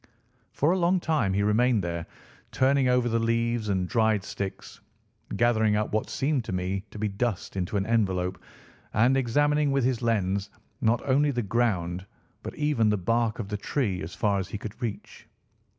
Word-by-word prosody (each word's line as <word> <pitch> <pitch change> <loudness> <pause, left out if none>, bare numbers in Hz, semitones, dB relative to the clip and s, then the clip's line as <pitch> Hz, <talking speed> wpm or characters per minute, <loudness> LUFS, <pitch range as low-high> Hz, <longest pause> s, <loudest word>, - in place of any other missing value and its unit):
For 150 +4 +2
a 185 - +1
long 180 +2 +3
time 155 - 0
he 100 - +2
remained 110 +1 +3
there, 85 -1 -4 0.4
turning 135 0 +3
over 125 -1 +3
the 115 0 +1
leaves 115 -1 0
and 95 -2 0
dried 110 -3 +2
sticks, 95 -1 -6 0.6
gathering 110 -3 +3
up 105 0 -1
what 110 - 0
seemed 140 -2 0
to - - -5
me 95 +1 -2
to - - -11
be 105 +1 -1
dust 100 -1 -3
into 95 +2 -1
an 95 - 0
envelope 95 -5 0 0.5
and 120 +5 +4
examining 145 +3 +2
with 135 -1 +1
his 125 -1 0
lens 100 -3 0 0.3
not 115 +1 +1
only 140 +2 +3
the 120 -4 -1
ground 95 -4 -1 0.3
but - - -7
even 150 -8 +2
the 105 - +2
bark 115 +4 0
of 110 - -4
the 105 - -2
tree 100 -3 -1
as 80 - -7
far 100 -2 +1
as 95 - -3
he - - -5
could 110 +4 -9
reach. 115 -4 -6
110 Hz, 180 wpm, -27 LUFS, 100-125 Hz, 0.6 s, and